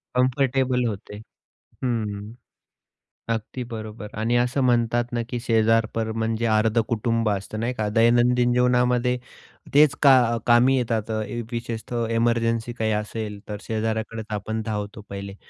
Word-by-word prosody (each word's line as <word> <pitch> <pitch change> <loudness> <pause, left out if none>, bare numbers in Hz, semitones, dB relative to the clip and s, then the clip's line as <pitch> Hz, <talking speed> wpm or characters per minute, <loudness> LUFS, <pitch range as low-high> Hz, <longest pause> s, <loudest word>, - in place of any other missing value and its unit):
Comfortable 130 -1 +2
होते. 105 -1 -6 0.7
हं, 115 -3 0
हं. 105 +3 -8 1.0
अगदी 115 +3 -5
बरोबर 110 -2 -7
आणि 115 +2 +1
असं 125 +3 +1
म्हणतात 120 -1 +1
ना 120 - 0
की, 120 - -3
शेजारपर 115 -1 +1
म्हणजे 115 +1 -1
अर्धं 110 +1 +3
कुटुंब 115 -1 0
असतं, 100 +2 -3
नाही 120 +2 -1
का? 110 -3 -2
दैनंदिन 120 +2 +3
जीवनामध्ये 125 0 +2 0.6
तेच 145 -1 +6
का 135 -1 +8 0.2
अ, - - 0
कामी 120 +3 +5
येतात. 115 -3 -1
अ, 110 - -1 0.3
विशेषतः 115 0 -3
एमर्जन्सी 115 0 +1
काही 110 -2 -1
असेल, 105 0 -3
तर 105 - -4
शेजाऱ्याकडेच 110 0 -3
आपण 110 +2 -3
धावतो 105 -1 -4
पहिले. 100 0 -6
115 Hz, 135 wpm, -24 LUFS, 110-120 Hz, 1.0 s, का